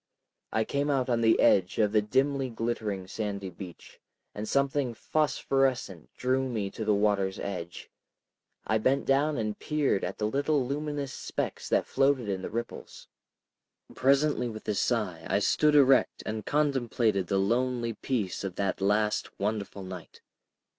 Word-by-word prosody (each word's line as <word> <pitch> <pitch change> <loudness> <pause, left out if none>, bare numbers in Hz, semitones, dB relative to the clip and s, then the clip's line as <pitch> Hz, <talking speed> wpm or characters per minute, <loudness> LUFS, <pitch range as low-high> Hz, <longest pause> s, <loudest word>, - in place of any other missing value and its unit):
I 110 - +1
came 140 +5 -1
out 130 -3 +1
on 115 -1 +2
the 115 0 +4
edge 95 -2 +4
of 105 -2 +3
the 105 0 +4
dimly 135 +5 +1
glittering 110 -4 -3
sandy 100 -1 -4
beach, 90 0 -11 0.3
and 105 +1 -5
something 140 -3 +1
phosphorescent 135 - 0
drew 130 +1 0
me 105 -5 -2
to 110 - -5
the 105 -1 +2
water's 100 -2 +1
edge. 90 -3 -6 0.7
I 110 0 +1
bent 130 +5 +1
down 145 +2 +2
and 110 -2 -2
peered 150 -9 0
at 90 - -3
the 105 - -1
little 140 +4 +1
luminous 145 0 -3
specks - - -4
that - - +2
floated 135 -5 +1
in 95 -1 -2
the - - -5
ripples. 115 +2 -6 0.8
Presently 135 -1 +2
with 110 -1 -9
a 105 - +1
sigh 100 -6 -1
I 95 - +3
stood 150 +8 +3
erect, 135 -2 +4
and 110 -1 -4
contemplated 120 -9 +1
the 100 - +1
lonely 120 +3 0
peace 110 -8 -2
of 95 -2 -4
that 100 -1 -1
last 105 +2 0
wonderful 100 -1 -3
night. 95 -2 -9
115 Hz, 155 wpm, -28 LUFS, 100-135 Hz, 0.8 s, the